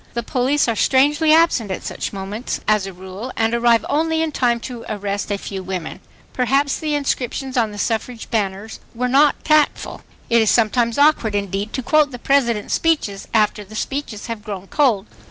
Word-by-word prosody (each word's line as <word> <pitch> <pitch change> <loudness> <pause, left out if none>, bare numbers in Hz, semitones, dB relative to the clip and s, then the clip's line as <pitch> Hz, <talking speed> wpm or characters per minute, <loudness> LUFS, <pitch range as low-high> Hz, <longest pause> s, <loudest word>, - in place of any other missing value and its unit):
The 235 - -1
police 260 +5 +1
are 230 - 0
strangely 295 +7 +3
absent 315 -9 +4
at 190 - -4
such - - -4
moments, 200 +5 -5
as 210 -2 +2
a - - -6
rule, 190 +6 -8
and 225 0 +1
arrive 235 -2 +3
only 320 +1 +1
in 320 - -2
time 240 -4 +1
to 240 -2 -7
arrest 205 -1 -3
a 200 - 0
few 195 -1 -6
women.... 185 -3 -5 0.3
Perhaps 275 +3 +1
the 305 -1 -1
inscriptions 270 -1 -2
on 230 -3 +2
the 205 - -9
suffrage 225 +2 -3
banners 205 -1 -2 0.2
were 250 +2 -1
not 280 +3 +3
tactful. 305 -1 +1 0.3
It 235 -1 +4
is 220 - +2
sometimes 230 +1 +2
awkward 285 -8 +3
indeed 200 +1 -2
to 260 - -3
quote 305 +3 +3
the 250 - -8
President's 240 -5 +1
speeches 290 -12 0
after 210 -1 +1
the 210 +2 -13
speeches 270 -3 -4
have 230 -3 -6
"grown 200 -4 -6
cold." 230 -5 +1
235 Hz, 185 wpm, -20 LUFS, 205-275 Hz, 0.3 s, absent